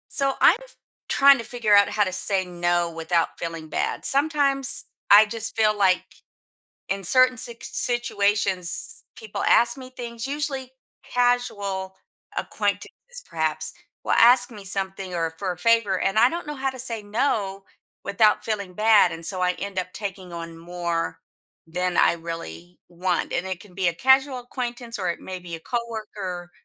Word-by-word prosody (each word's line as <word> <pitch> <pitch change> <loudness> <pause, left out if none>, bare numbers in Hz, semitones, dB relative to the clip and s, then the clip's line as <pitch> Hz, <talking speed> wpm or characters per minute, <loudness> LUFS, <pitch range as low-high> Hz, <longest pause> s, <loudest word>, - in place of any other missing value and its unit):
So, 275 -1 +1
I'm 380 - +6
f - - -13 0.3
trying 275 0 +6
to 230 - -6
figure 225 -3 0
out 200 0 +7
how 210 - +1
to 190 - -2
say 190 +1 +1
no, 175 -1 0
without 165 +1 -1
feeling 165 -2 -6
bad. - - -2
Sometimes 280 -2 +2 0.3
I 210 +2 +9
just 225 +1 -2
feel 215 -1 +3
like 190 -2 +3 0.9
in 195 0 -2
certain 255 +6 +4
sics 245 -2 -4
situations 205 -6 0
people 445 -1 -6
ask 240 0 +4
me 255 -1 -10
things 235 -2 -7
Usually 275 -2 -3 0.3
casual 205 -6 -1 0.4
acquaintances - - -2 0.4
perhaps 155 -1 -2 0.3
will - - 0
ask 245 +1 +6
me 210 -2 -10
something, 190 -1 -1
or 165 -1 -2
for 185 +2 -3
a 175 - -11
favor 220 -2 +2
and 195 - 0
I 235 +3 +6
don't 340 -1 -5
know 295 - -5
how 270 -1 -2
to 260 - -11
say 235 -4 -3
no 205 -3 -1 0.4
without 210 +2 +3
feeling 200 -4 -3
bad, 215 -2 +5
and 165 0 -7
so 185 0 -4
I 180 0 +2
end 200 -2 -3
up 185 0 -8
taking 190 -3 -7
on 165 -1 -7
more 170 0 -3 0.5
than 180 +2 -2
I - - +5
really 165 - -8
want, 180 0 -2
and 185 - -2
it 185 -2 -4
can 185 -1 -16
be 185 -2 +1
a - - 0
casual 265 - +3
acquaintance, 245 -1 -5
or 185 -3 -2
it 170 - -5
may 185 -1 -7
be 175 -2 -7
a - - -13
coworker, 210 -5 -5
200 Hz, 170 wpm, -24 LUFS, 180-245 Hz, 0.9 s, I